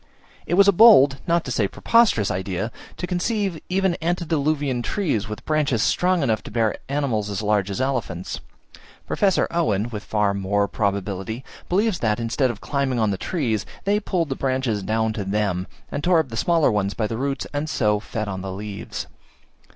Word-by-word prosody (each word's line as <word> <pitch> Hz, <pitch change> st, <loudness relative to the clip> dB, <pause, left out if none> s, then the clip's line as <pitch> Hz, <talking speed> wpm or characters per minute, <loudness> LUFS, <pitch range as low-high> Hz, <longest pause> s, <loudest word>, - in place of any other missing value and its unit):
It 175 Hz, -, +1 dB
was 200 Hz, +1 st, +6 dB
a -, -, +8 dB
bold, 170 Hz, -, +7 dB
not 170 Hz, 0 st, +2 dB
to 125 Hz, -, -4 dB
say 110 Hz, -4 st, +1 dB
preposterous, 210 Hz, -, +3 dB
idea 95 Hz, +4 st, -3 dB, 0.3 s
to -, -, -3 dB
conceive 185 Hz, -1 st, -1 dB
even 190 Hz, 0 st, +2 dB
antediluvian 155 Hz, -6 st, 0 dB
trees, 120 Hz, -, -1 dB
with 105 Hz, -, -7 dB
branches 145 Hz, -7 st, +1 dB
strong 180 Hz, -3 st, +2 dB
enough 110 Hz, -5 st, +1 dB
to -, -, -6 dB
bear 110 Hz, -1 st, +1 dB
animals 130 Hz, -8 st, -1 dB
as 100 Hz, +1 st, -3 dB
large 105 Hz, -2 st, +1 dB
as 100 Hz, -, -3 dB
elephants. 125 Hz, -10 st, -2 dB, 0.7 s
Professor 195 Hz, -3 st, +2 dB
Owen, 115 Hz, -, 0 dB
with 105 Hz, -2 st, -5 dB
far 105 Hz, -2 st, +1 dB
more 100 Hz, +1 st, 0 dB
probability, 100 Hz, +2 st, -2 dB, 0.3 s
believes 200 Hz, 0 st, +1 dB
that, 110 Hz, -1 st, 0 dB
instead 120 Hz, +3 st, +1 dB
of 115 Hz, -3 st, -6 dB
climbing 140 Hz, -3 st, -1 dB
on 110 Hz, -3 st, +2 dB
the -, -, 0 dB
trees, 115 Hz, -, -1 dB, 0.2 s
they 205 Hz, +1 st, +2 dB
pulled 180 Hz, -6 st, -1 dB
the 135 Hz, -, -1 dB
branches 130 Hz, -6 st, -1 dB
down 110 Hz, +2 st, 0 dB
to 105 Hz, -, -3 dB
them, 95 Hz, -2 st, -1 dB, 0.2 s
and 145 Hz, -, -3 dB
tore 180 Hz, -1 st, +4 dB
up 160 Hz, -5 st, +1 dB
the 115 Hz, -, -6 dB
smaller 165 Hz, +1 st, +3 dB
ones 100 Hz, -1 st, 0 dB
by 110 Hz, -, 0 dB
the 115 Hz, -, -3 dB
roots, 135 Hz, +3 st, -2 dB
and 145 Hz, +2 st, -2 dB
so 105 Hz, -6 st, +1 dB
fed 110 Hz, 0 st, -4 dB
on 95 Hz, -2 st, -4 dB
the 95 Hz, 0 st, -5 dB
leaves. 100 Hz, +1 st, -6 dB
120 Hz, 185 wpm, -23 LUFS, 105-160 Hz, 0.7 s, a